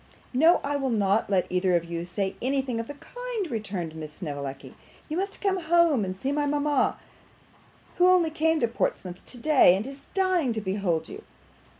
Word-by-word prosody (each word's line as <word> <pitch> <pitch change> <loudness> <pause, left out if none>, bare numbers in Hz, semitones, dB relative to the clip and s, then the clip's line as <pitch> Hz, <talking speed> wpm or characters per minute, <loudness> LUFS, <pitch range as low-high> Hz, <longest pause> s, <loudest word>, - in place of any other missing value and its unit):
'No, 320 +7 +5
I 285 0 -1
will 270 -2 -1
not 205 -2 +1
let 190 -3 +2
either 180 0 +2
of 170 -1 +1
you 170 0 -4
say 190 +2 -3
anything 260 -2 -1
of 230 - -4
the 290 - -7
kind,' 480 - -5
returned 195 -7 -4
Miss 155 -1 -7
Snevellicci. 140 -5 -6 0.3
'You 310 - -4
must 390 +3 -3
come 390 -2 +1
home 330 - +3
and 185 -1 -4
see 265 +8 -2
mama, 290 0 +1 1.0
who 360 - +5
only 360 -3 +4
came 320 +1 +1
to 235 - +3
Portsmouth 185 -5 -3
today, 255 -7 +4
and 200 +3 -3
is 275 +1 -10
dying 370 -9 +2
to 220 - -3
behold 190 -4 -1
you. - - -9
250 Hz, 180 wpm, -26 LUFS, 190-315 Hz, 1.0 s, No